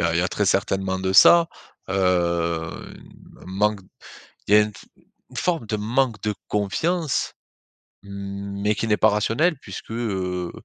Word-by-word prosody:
a 85 Hz, 0 st, +1 dB
il -, -, +2 dB
y -, -, +3 dB
a 90 Hz, -, 0 dB
très 100 Hz, +3 st, -1 dB
certainement 95 Hz, 0 st, 0 dB
de 95 Hz, 0 st, -1 dB
ça, 170 Hz, -, +7 dB, 0.4 s
heu, 95 Hz, -, -2 dB
un 85 Hz, -3 st, -2 dB
manque 100 Hz, +2 st, 0 dB, 0.7 s
il 105 Hz, -, +2 dB
y -, -, +9 dB
a 105 Hz, -, +7 dB
une 105 Hz, 0 st, -1 dB
f -, -, -14 dB, 0.5 s
une -, -, -11 dB
forme 170 Hz, -10 st, 0 dB
de 105 Hz, 0 st, -2 dB
manque 115 Hz, +1 st, 0 dB
de 105 Hz, -1 st, -2 dB
confiance 145 Hz, -, -1 dB, 0.7 s
mais 100 Hz, +1 st, -4 dB
qui 115 Hz, -, -2 dB
n'est 105 Hz, -1 st, +2 dB
pas 110 Hz, -, +4 dB
rationnel, 125 Hz, +10 st, +1 dB
puisque, 135 Hz, -, -10 dB
heu, 95 Hz, -6 st, -3 dB
100 Hz, 165 wpm, -23 LUFS, 95-110 Hz, 0.7 s, y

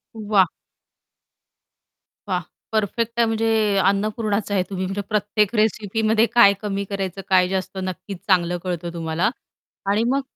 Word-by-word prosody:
वाह! 205 Hz, -3 st, +3 dB, 1.8 s
वाह! 180 Hz, -2 st, 0 dB, 0.3 s
परफेक्ट 225 Hz, +2 st, -1 dB
आहे 235 Hz, -, +5 dB
म्हणजे 225 Hz, 0 st, 0 dB, 0.3 s
अन्नपूर्णाच 205 Hz, +1 st, 0 dB
आहे 195 Hz, -2 st, +2 dB
तुम्ही 190 Hz, -1 st, -3 dB
म्हणजे 195 Hz, +2 st, -3 dB
प्रत्येक 210 Hz, 0 st, +1 dB
रेसिपीमध्ये 215 Hz, +1 st, +2 dB
काय 200 Hz, -4 st, +8 dB
कमी 200 Hz, -1 st, -2 dB
करायचं, 195 Hz, -1 st, -3 dB
काय 185 Hz, -1 st, +5 dB
जास्त. 190 Hz, 0 st, -3 dB
नक्कीच 185 Hz, +1 st, -5 dB
चांगलं 175 Hz, -2 st, +2 dB
कळतं 175 Hz, -2 st, -4 dB
तुम्हाला 165 Hz, +2 st, 0 dB, 0.6 s
आणि 215 Hz, +3 st, +2 dB
मग 275 Hz, -, +1 dB
200 Hz, 125 wpm, -22 LUFS, 185-215 Hz, 1.8 s, काय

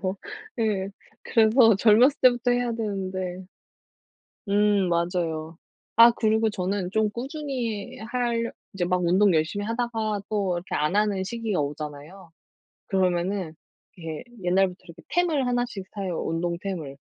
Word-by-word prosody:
그러니까요. 190 Hz, +1 st, -2 dB, 0.4 s
네. 210 Hz, -4 st, 0 dB, 0.3 s
그래서 225 Hz, -1 st, +5 dB
젊었을 235 Hz, +7 st, +5 dB
때부터 245 Hz, -1 st, +4 dB
해야 245 Hz, -1 st, +1 dB
되는데 190 Hz, -4 st, -4 dB, 1.0 s
음 205 Hz, -2 st, +3 dB
맞아요. 170 Hz, -2 st, -1 dB, 0.4 s
아 230 Hz, +1 st, +9 dB
그리고 220 Hz, -1 st, +2 dB
저는 185 Hz, -1 st, -2 dB
좀 220 Hz, -1 st, +2 dB
꾸준히 250 Hz, -3 st, -4 dB
할 235 Hz, 0 st, -1 dB, 0.2 s
이제 190 Hz, -3 st, -1 dB
막 180 Hz, 0 st, +1 dB
운동 185 Hz, +1 st, +4 dB
열심히 170 Hz, +6 st, 0 dB
하다가 225 Hz, -3 st, -2 dB
또 200 Hz, -4 st, 0 dB
이렇게 175 Hz, +2 st, -5 dB
안 150 Hz, +6 st, +1 dB
하는 205 Hz, -3 st, +1 dB
시기가 225 Hz, -4 st, -2 dB
오잖아요. 150 Hz, +5 st, -6 dB, 0.6 s
그러면은 185 Hz, -2 st, 0 dB, 0.4 s
이렇게 160 Hz, -3 st, -6 dB, 0.2 s
옛날부터 185 Hz, 0 st, +2 dB
이렇게 170 Hz, 0 st, -13 dB
템을 320 Hz, -7 st, +1 dB
하나씩 245 Hz, -5 st, -2 dB
사요. 190 Hz, -4 st, -3 dB
운동 170 Hz, +1 st, -1 dB
템을. 160 Hz, -9 st, -5 dB
200 Hz, 300 characters per minute, -25 LUFS, 180-230 Hz, 1.0 s, 아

